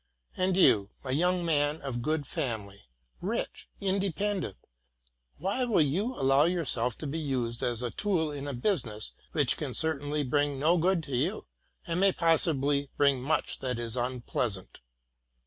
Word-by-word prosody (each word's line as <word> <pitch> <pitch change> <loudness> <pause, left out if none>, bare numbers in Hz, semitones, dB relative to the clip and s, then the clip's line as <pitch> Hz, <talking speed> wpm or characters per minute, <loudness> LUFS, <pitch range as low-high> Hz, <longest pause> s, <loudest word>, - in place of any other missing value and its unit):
And 185 0 +1
you, 105 - +5 0.2
a 130 - -2
young 175 +5 +1
man 150 -1 +1
of 130 -4 -4
good 155 +2 -1
family, 110 - -4 0.4
rich, - - -3
independent, 195 - -1 0.8
why 195 - -1
will 225 -10 +3
you 195 - -1
allow 135 +2 +4
yourself 130 -9 0
to - - -6
be 150 +3 -3
used 125 -6 -2
as 120 0 0
a 120 - -2
tool 175 -7 0
in 145 -1 -5
a 140 - -3
business 120 - -1 0.2
which - - +2
can - - -4
certainly 150 -1 0
bring 145 +1 +1
no 155 +6 +3
good 175 0 +2
to 140 -4 -4
you, 165 - -1 0.4
and 170 0 -1
may 195 0 +5
possibly 145 -5 +2
bring 140 -3 +3
much 150 +5 0
that 125 -2 -2
is 120 0 -3
unpleasant? 120 -5 -2
145 Hz, 155 wpm, -29 LUFS, 125-175 Hz, 0.8 s, you